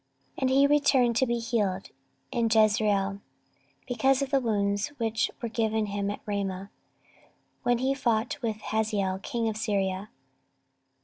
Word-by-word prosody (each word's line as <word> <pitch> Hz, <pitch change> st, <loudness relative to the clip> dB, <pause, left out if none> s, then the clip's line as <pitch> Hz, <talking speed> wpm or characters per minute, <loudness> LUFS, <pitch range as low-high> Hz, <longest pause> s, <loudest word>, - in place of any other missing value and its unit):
14:022:006 -, -, -11 dB
And 260 Hz, -, +2 dB
he 275 Hz, +2 st, +5 dB
returned 280 Hz, -5 st, +3 dB
to 260 Hz, -, +4 dB
be 235 Hz, 0 st, 0 dB
healed 215 Hz, -5 st, -1 dB, 0.4 s
in 235 Hz, -3 st, +1 dB
Jezreel 210 Hz, -2 st, +2 dB, 0.7 s
because 265 Hz, +3 st, +2 dB
of 275 Hz, -, -5 dB
the 275 Hz, -, +4 dB
wounds 205 Hz, -4 st, 0 dB
which 225 Hz, -2 st, 0 dB
were -, -, 0 dB
given 220 Hz, -1 st, 0 dB
him 200 Hz, -1 st, -2 dB
at 205 Hz, -, -5 dB
Ramah, 195 Hz, -1 st, -3 dB, 0.9 s
when 245 Hz, -1 st, +2 dB
he 260 Hz, +3 st, +1 dB
fought 245 Hz, +1 st, 0 dB
with 220 Hz, -3 st, -2 dB
Hazael 210 Hz, -4 st, -1 dB
king 230 Hz, +3 st, -2 dB
of 220 Hz, -1 st, -2 dB
Syria. 195 Hz, -2 st, -1 dB
220 Hz, 145 wpm, -28 LUFS, 205-245 Hz, 0.9 s, he